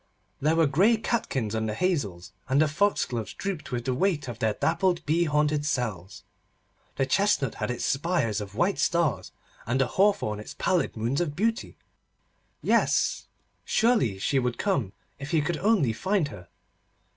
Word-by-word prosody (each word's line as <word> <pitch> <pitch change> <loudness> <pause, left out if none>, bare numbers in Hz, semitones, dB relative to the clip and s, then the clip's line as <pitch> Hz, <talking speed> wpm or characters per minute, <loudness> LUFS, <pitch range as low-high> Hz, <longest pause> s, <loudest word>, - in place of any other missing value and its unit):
There 155 +3 +2
were 165 -1 +4
grey 190 +11 +3
catkins 135 - -2
on 110 0 -1
the 105 - -3
hazels, 105 - -2 0.2
and 135 +2 +3
the 155 - +4
foxgloves 145 - -1
drooped 195 -8 -5
with 120 -1 -3
the 130 - 0
weight 150 -1 0
of 120 -2 -6
their 110 -1 0
dappled 170 0 0
bee 165 +3 +2
haunted 150 -1 +1
cells. 110 - -3 0.7
The 135 - +1
chestnut 195 - +1
had - - -1
its 125 - -2
spires 135 - 0
of 100 -1 -8
white 180 - +1
stars, 155 - 0 0.4
and 125 +3 0
the 135 - +4
hawthorn 185 - +1
its 105 - -9
pallid 180 -9 0
moons 120 +8 0
of 150 -4 -2
beauty. 225 - -1 0.9
Yes: - - +2 0.4
surely 220 - +2
she 135 +8 +1
would 125 -2 -1
come 135 - -1 0.3
if 140 0 -7
he 160 - +2
could 155 +2 -1
only 195 - +2
find 185 - 0
her! 90 -9 -11
145 Hz, 165 wpm, -27 LUFS, 115-180 Hz, 0.9 s, were